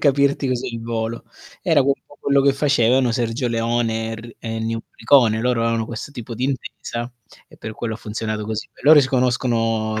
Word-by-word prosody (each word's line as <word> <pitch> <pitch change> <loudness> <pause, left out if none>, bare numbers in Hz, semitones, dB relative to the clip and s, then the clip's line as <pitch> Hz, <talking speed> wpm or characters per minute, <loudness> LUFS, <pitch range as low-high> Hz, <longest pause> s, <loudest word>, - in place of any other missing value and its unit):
capirti 140 -1 +2
così 125 -1 -1
al - - -7
volo. 115 0 -3 0.4
Era 160 -5 +3
un 140 +1 +3
po' 145 - -18
quello 140 0 +3
che 140 0 +4
facevano 130 -3 +3
Sergio 120 +1 -1
Leone 115 -1 0
er 110 +1 -8
e 115 - -14 0.2
Ennio 115 0 -2
Morricone. 115 -6 +3
Loro 125 -1 +1
avevano 115 -1 0
questo 120 +5 -7
tipo 120 -2 -7
di 125 - -2
intesa 125 -2 -4 0.4
e - - -17
per 110 - -7
quello 115 +1 -4
ha - - -6
funzionato 110 0 -4
così. 110 0 -4
Beh - - -19
loro 150 0 +8
si 130 - 0
conoscono 115 -4 +1
120 Hz, 190 wpm, -21 LUFS, 115-130 Hz, 0.4 s, loro